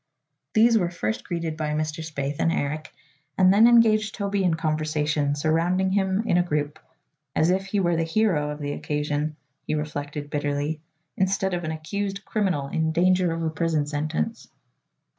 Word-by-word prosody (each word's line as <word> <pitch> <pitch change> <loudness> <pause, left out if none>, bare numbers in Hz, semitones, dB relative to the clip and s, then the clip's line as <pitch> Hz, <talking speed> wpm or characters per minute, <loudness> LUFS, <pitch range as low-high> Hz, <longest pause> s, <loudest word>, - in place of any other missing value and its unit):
These 225 +1 +5
were 175 -3 0
first 110 -11 -3
greeted 165 -2 -3
by 155 -1 -2
Mr. 155 +1 -2
Spaythe 145 -2 -4
and 165 - +2
Eric 155 0 -2 0.5
and 185 0 +6
then 220 +3 +7
engaged 220 -3 +4
Toby 200 -2 -1
in 175 -3 +2
conversation, 155 -2 0
surrounding 170 +5 +1
him 190 +1 +1
in 175 - +2
a - - +5
group 150 -3 -2 0.6
as 160 +3 +3
if 190 +1 0
he 200 +1 0
were 175 -3 +2
the 165 - +1
hero 165 -4 +1
of 150 - -4
the 145 -1 -4
occasion, 150 +1 -2 0.3
he - - 0
reflected 145 -1 -4
bitterly, 145 +1 -2 0.4
instead 190 0 +1
of 175 0 -2
an 155 - -2
accused 195 +5 -4
criminal 185 -10 0
in 160 +2 0
danger 180 +1 +3
of 165 0 -3
a 160 - 0
prison 160 -2 0
sentence! 145 - -3
160 Hz, 170 wpm, -25 LUFS, 150-190 Hz, 0.6 s, then